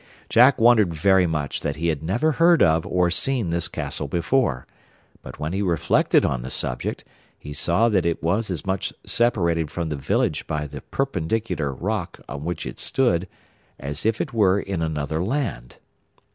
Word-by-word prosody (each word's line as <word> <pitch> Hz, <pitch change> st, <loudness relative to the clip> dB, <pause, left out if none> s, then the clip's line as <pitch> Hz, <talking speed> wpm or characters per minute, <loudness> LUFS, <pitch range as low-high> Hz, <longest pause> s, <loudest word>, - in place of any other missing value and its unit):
Jack 125 Hz, +4 st, +6 dB
wondered 110 Hz, -7 st, +4 dB
very 95 Hz, +2 st, +3 dB
much 75 Hz, -4 st, -2 dB
that 70 Hz, -, -3 dB
he 85 Hz, +3 st, -1 dB
had 75 Hz, -3 st, -2 dB
never 110 Hz, -, +1 dB
heard 165 Hz, +2 st, +4 dB
of 80 Hz, +2 st, +2 dB
or 90 Hz, -3 st, +1 dB
seen 115 Hz, -1 st, 0 dB
this 85 Hz, 0 st, +1 dB
castle 75 Hz, -, -3 dB
before; 85 Hz, -, 0 dB, 0.6 s
but -, -, -10 dB
when 75 Hz, +3 st, -3 dB
he 95 Hz, -, -1 dB
reflected 85 Hz, -6 st, +2 dB
on 65 Hz, -, -1 dB
the 65 Hz, -, -6 dB
subject, -, -, -3 dB, 0.3 s
he 75 Hz, -, -9 dB
saw 85 Hz, +9 st, +2 dB
that 100 Hz, -6 st, +2 dB
it 85 Hz, -1 st, -2 dB
was 100 Hz, +7 st, 0 dB
as 85 Hz, -6 st, -3 dB
much 95 Hz, -1 st, -2 dB
separated 85 Hz, -10 st, +1 dB
from 85 Hz, 0 st, -4 dB
the 75 Hz, -, -2 dB
village 70 Hz, -, -1 dB
by 75 Hz, -1 st, -2 dB
the 70 Hz, -1 st, -8 dB
perpendicular 110 Hz, -, -2 dB
rock 95 Hz, -, -4 dB
on 70 Hz, +2 st, -6 dB
which 85 Hz, 0 st, -4 dB
it -, -, -7 dB
stood 95 Hz, -9 st, +1 dB, 0.5 s
as 70 Hz, +2 st, -3 dB
if 110 Hz, 0 st, +1 dB
it 135 Hz, -, -3 dB
were 100 Hz, -3 st, +3 dB
in 95 Hz, -4 st, -4 dB
another 80 Hz, 0 st, -2 dB
land. 110 Hz, -, -3 dB
85 Hz, 175 wpm, -23 LUFS, 80-110 Hz, 0.6 s, Jack